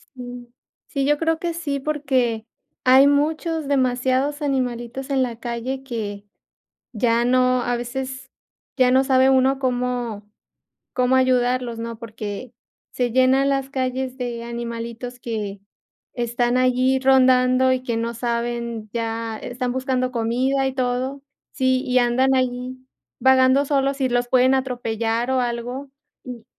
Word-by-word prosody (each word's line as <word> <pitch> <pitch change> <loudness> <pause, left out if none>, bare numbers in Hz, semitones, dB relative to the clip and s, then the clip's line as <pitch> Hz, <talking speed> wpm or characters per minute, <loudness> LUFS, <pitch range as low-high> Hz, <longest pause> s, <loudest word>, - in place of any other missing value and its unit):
Mm, 245 -1 -8 0.4
sí, 275 -4 -2
yo 295 +1 +2
creo 325 0 +1
que 340 -1 -3
sí, 290 -5 -3
porque 260 -6 0 0.4
hay 260 +2 +7
muchos, 310 +1 0
demasiados 260 +2 +1
animalitos 255 -1 -2
en 270 -1 +2
la 235 -3 -3
calle 245 +3 -4
que, 210 -5 -5 0.7
ya 235 +1 +1
no, 255 0 +3
a 245 0 0
veces, 260 +2 -5 0.5
ya 255 -1 +4
no 265 +1 +4
sabe 265 0 +4
uno 265 +1 +3
cómo 245 -5 -2 0.7
cómo 255 0 +2
ayudarlos, 250 -2 +1
¿no?, 230 -1 -5
porque 220 +1 -7 0.4
se 245 -2 -1
llenan 260 +2 +4
las 275 -1 -1
calles 260 0 -2
de 240 -2 -4
animalitos 235 +1 -6
que 210 -4 -4 0.5
están 240 +1 0
allí 255 +1 +3
rondando 260 -1 +4
y 255 0 -1
que 235 -3 -2
no 230 +1 -2
saben 235 -2 -3
ya, 225 -1 -3
están 245 0 -3
buscando 255 -1 -1
comida 255 +4 0
y 265 - -2
todo, 255 +2 -2 0.3
¿sí? 260 -1 +1
Y 250 0 0
andan 255 +2 +3
ahí 255 0 -1 0.4
vagando 265 +1 +5
solos 275 -1 0
y 260 - +1
los 245 0 0
pueden 255 +1 +4
atropellar 240 -2 -1
o 260 -1 +2
algo. 245 +3 -4 0.3
Y 245 -3 -8
255 Hz, 140 wpm, -22 LUFS, 240-265 Hz, 0.7 s, hay